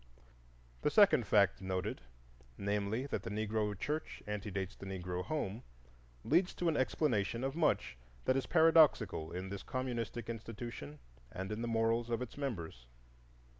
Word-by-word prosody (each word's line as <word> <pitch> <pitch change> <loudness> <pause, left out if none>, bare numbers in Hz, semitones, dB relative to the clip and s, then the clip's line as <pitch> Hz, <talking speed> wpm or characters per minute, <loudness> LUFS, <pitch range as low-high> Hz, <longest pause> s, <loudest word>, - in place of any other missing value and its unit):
The - - +2
second 195 - +5
fact 100 -2 +4
noted, 95 -1 -2 0.6
namely, 100 +4 -1
that 140 - -2
the 115 - -6
Negro 105 -1 -1
church 150 +9 -3
antedates 100 -2 -3
the 95 - -9
Negro 90 -1 -3
home, 115 -4 -3 0.6
leads 180 +4 +3
to 175 - -1
an 160 - +2
explanation 120 -5 +1
of 135 +1 -1
much 160 - +1 0.3
that 130 - +3
is 135 - 0
paradoxical 155 - +5
in 90 +2 -4
this 100 -1 -5
communistic 120 -3 -3
institution 115 -9 -6 0.3
and 95 +2 -5
in 105 +2 -3
the 120 - -2
morals 115 +1 +1
of 115 - 0
its 125 - -9
members. 85 - -5
110 Hz, 145 wpm, -35 LUFS, 95-130 Hz, 0.6 s, second